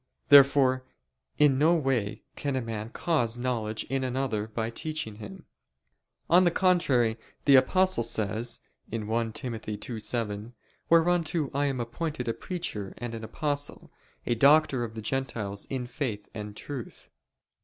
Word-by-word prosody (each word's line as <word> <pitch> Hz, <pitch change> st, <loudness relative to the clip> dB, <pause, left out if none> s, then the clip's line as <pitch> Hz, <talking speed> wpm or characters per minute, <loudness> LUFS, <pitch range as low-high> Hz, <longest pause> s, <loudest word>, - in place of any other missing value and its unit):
Therefore 135 Hz, -2 st, +6 dB, 0.5 s
in 145 Hz, -3 st, +4 dB
no 160 Hz, +4 st, +5 dB
way 125 Hz, -9 st, -1 dB
can 140 Hz, -2 st, -2 dB
a 130 Hz, -, 0 dB
man 110 Hz, -1 st, -5 dB
cause 120 Hz, -6 st, 0 dB
knowledge 115 Hz, -3 st, -2 dB
in 135 Hz, +1 st, -2 dB
another 125 Hz, -5 st, -1 dB
by 110 Hz, +1 st, -3 dB
teaching 155 Hz, -7 st, -4 dB
him. 100 Hz, -3 st, -10 dB, 0.8 s
On 180 Hz, +2 st, +6 dB
the 175 Hz, -, +5 dB
contrary, 140 Hz, -11 st, +2 dB, 0.3 s
The 140 Hz, -2 st, +8 dB
Apostle 185 Hz, +4 st, +3 dB
says 110 Hz, 0 st, -1 dB, 0.3 s
(1 115 Hz, +1 st, -2 dB
Tim. 125 Hz, +1 st, -4 dB
2:7): 110 Hz, 0 st, -2 dB, 0.4 s
"Whereunto 165 Hz, -3 st, +2 dB
I 140 Hz, +1 st, +1 dB
am 135 Hz, -2 st, -2 dB
appointed 125 Hz, +3 st, -4 dB
a 115 Hz, -, +1 dB
preacher 140 Hz, -, -5 dB
and 120 Hz, -1 st, -5 dB
an 115 Hz, -1 st, -6 dB
apostle... 145 Hz, +4 st, -2 dB, 0.3 s
a 120 Hz, -, +1 dB
doctor 140 Hz, +1 st, +4 dB
of 115 Hz, -1 st, -6 dB
the 110 Hz, -, -6 dB
Gentiles 110 Hz, -5 st, -2 dB
in 130 Hz, -2 st, -3 dB
faith 120 Hz, -5 st, -4 dB
and 105 Hz, -1 st, -7 dB
truth." 135 Hz, -5 st, -8 dB
125 Hz, 140 wpm, -28 LUFS, 110-145 Hz, 0.8 s, The